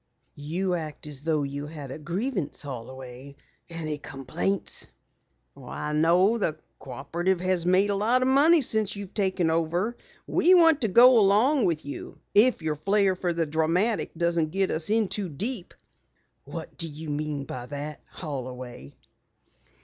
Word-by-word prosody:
"You 175 +6 -2
act 155 -4 -5
as 145 -3 -8
though 155 -1 0
you 140 +1 -5
had 150 -4 -8
a 155 - -7
grievance, 185 - -3
Holloway. 130 +1 -8 0.3
Any 155 -3 -4
complaints?" 145 +9 -3 0.7
"Why, 150 - -6
no, 175 +8 +3
the 160 -7 -1 0.2
Cooperative 170 +8 -2
has 185 -2 0
made 190 +3 +4
a - - 0
lot 235 +6 +3
of - - +1
money 295 +4 +5
since 220 -3 0
you've 200 -2 -8
taken 185 -5 +1
over. 170 +8 0 0.3
We 365 +2 +4
want 325 -4 +5
to 225 - +2
go 240 +4 +7
along 220 +7 +4
with 160 -3 -1
you, 145 - -7 0.2
if 215 -3 +4
your 155 -1 -1
flare 195 +3 +2
for 180 -1 -1
the 165 -1 0
dramatic 165 +8 +1
doesn't 170 -2 +1
get 190 +3 0
us 160 +2 -1
in 220 -1 +2
too 195 -1 -2
deep." 195 - -3 0.7
"What - - -8
do 165 - 0
you 155 +2 -9
mean 145 -1 -3
by 125 -2 -7
that, 145 +2 -6
Holloway?" 125 - -7
170 Hz, 155 wpm, -26 LUFS, 150-205 Hz, 0.7 s, go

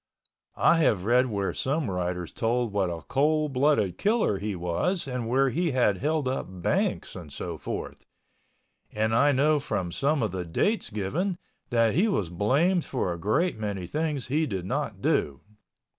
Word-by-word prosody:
I 170 - +5
have 110 - +2
read 125 +3 +4
where 100 -4 -2
some 140 +1 -1
writers 90 -1 -3
told 115 -1 -1
what 100 -3 +1
a 85 -2 -5
cold 150 - +1
blooded 130 - +2
killer 210 - +2
he 105 0 -3
was 90 - -1
and 125 -3 -3
where 135 +2 +3
he 165 +2 0
had 115 -6 +3
held 150 -1 0
up 130 - -2
banks 90 -2 -1
and - - -9
so - - -5
forth, - - -6 0.9
and 110 +1 0
I 140 +5 +4
know 145 +3 +3
from 100 -10 -3
some 140 - +1
of 105 - -1
the 90 -1 -3
dates 200 - 0
given 155 - -2 0.3
that 115 -2 +3
he 200 +7 +3
was 100 - -1
blamed 145 - +2
for 110 -9 -2
a 85 - -7
great 110 - 0
many 100 -4 -3
things 150 - -2
he 150 +4 0
did 95 -7 -4
not 95 - -3
do. 70 -2 +1
125 Hz, 175 wpm, -27 LUFS, 95-150 Hz, 0.9 s, I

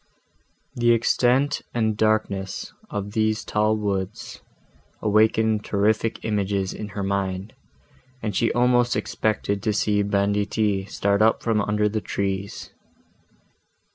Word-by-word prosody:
The 120 -1 +3
extent 125 +4 +2
and 110 -2 +1
darkness 105 -3 -1 0.2
of 105 0 -4
these 110 0 0
tall 105 +1 +1
woods 105 +3 -4 0.6
awakened 110 0 +2
terrific 110 +2 0
images 100 -3 -1
in 105 - -6
her 100 - -1
mind, 95 0 -2 0.7
and 105 -5 -3
she 115 - +2
almost 120 0 +3
expected 100 -2 -1
to 105 +1 0
see 105 0 +1
banditti 100 0 0
start 100 +1 0
up 110 +1 +3
from 110 -2 +1
under 105 +1 +1
the 110 +1 -2
trees. 100 -1 -3
105 Hz, 115 wpm, -24 LUFS, 100-110 Hz, 0.7 s, The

